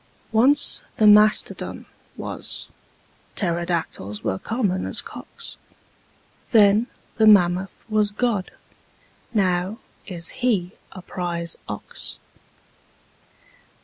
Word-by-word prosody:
Once 265 +6 +4 0.2
the 215 - +3
mastodon 210 0 +4 0.3
was: - - -5 0.7
pterodactyls 170 - -2
were 95 - -1
common 205 -6 -1
as - - -1
cocks: - - -8 0.9
Then 215 0 +5 0.3
the 220 -1 +5
mammoth 185 -2 +4
was 215 -2 +1
God: 210 -3 -1 0.8
now 185 -1 0 0.3
is 175 -3 -1
He 200 -8 +1 0.2
a 185 - -10
prize 170 -2 -3
ox. 105 - -6
195 Hz, 85 wpm, -23 LUFS, 175-215 Hz, 0.9 s, Then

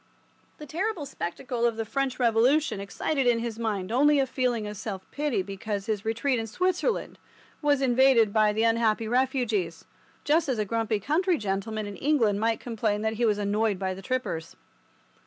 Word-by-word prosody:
The 300 - -9
terrible 355 +1 -2
spectacle 235 +3 -4
of 235 -2 +2
the 225 - -2
French 270 +2 -2
Revolution 245 +3 +3
excited 250 +8 -1
in 240 -1 +4
his 230 -1 -4
mind 210 -4 -2
only 290 +4 +4
a 270 - +3
feeling 250 -4 -1
of 210 0 -5
self 190 -2 -6
pity 285 -10 -1
because 195 +1 -4
his 215 -2 -2
retreat 230 +3 0
in 225 - -3
Switzerland 365 - -1 0.4
was 290 -2 +2
invaded 245 -4 +4
by 215 -1 +4
the 220 +2 0
unhappy 225 -1 +2
refugees, 235 -8 0 0.4
just 310 +1 +2
as 255 - 0
a 210 - 0
grumpy 225 0 -1
country 335 - +1
gentleman 210 0 -3
in 205 -1 -7
England 235 -9 +2
might 225 +1 +1
complain 215 -3 -2
that 220 0 0
he - - +4
was 210 -2 +2
annoyed 205 0 0
by 190 0 -2
the 190 - -9
trippers. 195 -8 -3
230 Hz, 175 wpm, -27 LUFS, 210-265 Hz, 0.4 s, in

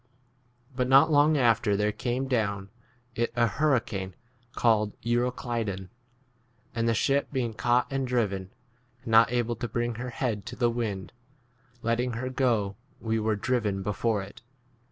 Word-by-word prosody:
But 125 -1 0
not 135 +4 +6
long 150 +1 +5
after 115 -5 +3
there 105 +1 +1
came 125 +4 -2
down 100 -6 -1 0.4
it 120 +1 -1
a 120 -1 +4
hurricane 115 -8 0 0.3
15 120 - -39
called 105 -3 +1
Euroclydon. 120 -5 -1 0.8
And 115 0 0
the 115 - +2
ship 140 +5 +1
being 125 -5 -1
caught 120 +2 +2
and 135 -1 -1
driven, 100 -7 -1 0.5
and - - -15
not 115 +1 +6
able 120 -1 0
to 120 - -3
bring 120 +2 -1
her 125 - -4
head 115 -4 -3
to 120 - -6
the 120 -2 +2
wind, 105 -5 -3 0.7
letting 120 +2 0
her 130 +3 -3
go 115 -7 0 0.2
we 110 0 -1
were 110 0 +1
driven 105 -1 0
16 95 - -4
[before 105 +1 0
it]. 95 - -12
115 Hz, 155 wpm, -27 LUFS, 105-125 Hz, 0.8 s, not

